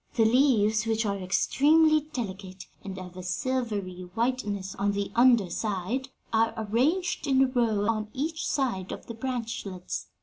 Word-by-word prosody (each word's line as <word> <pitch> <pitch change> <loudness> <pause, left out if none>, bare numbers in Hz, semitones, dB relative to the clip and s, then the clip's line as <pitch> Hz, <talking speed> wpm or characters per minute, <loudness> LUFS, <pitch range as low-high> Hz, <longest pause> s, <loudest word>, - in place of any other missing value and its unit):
The 225 - +4
leaves, 220 -3 +3
which 225 0 +1
are 200 -1 -1
extremely 305 - +4
delicate 190 -6 -6 0.2
and 195 -1 -6
of 180 -1 -9
a 185 - -7
silvery 200 -4 -3
whiteness 210 -5 -1
on 200 +1 +1
the 200 0 -2
under 235 -6 +4
side, 215 +7 -2 0.2
are 225 0 +2
arranged 265 - 0
in 270 -1 +4
a - - +3
row 230 -5 +1
on 215 -1 -1
each 310 +5 -3
side 235 -10 -1
of - - -7
the 230 - -7
branchlets. 225 -6 -4
220 Hz, 155 wpm, -27 LUFS, 195-255 Hz, 0.2 s, The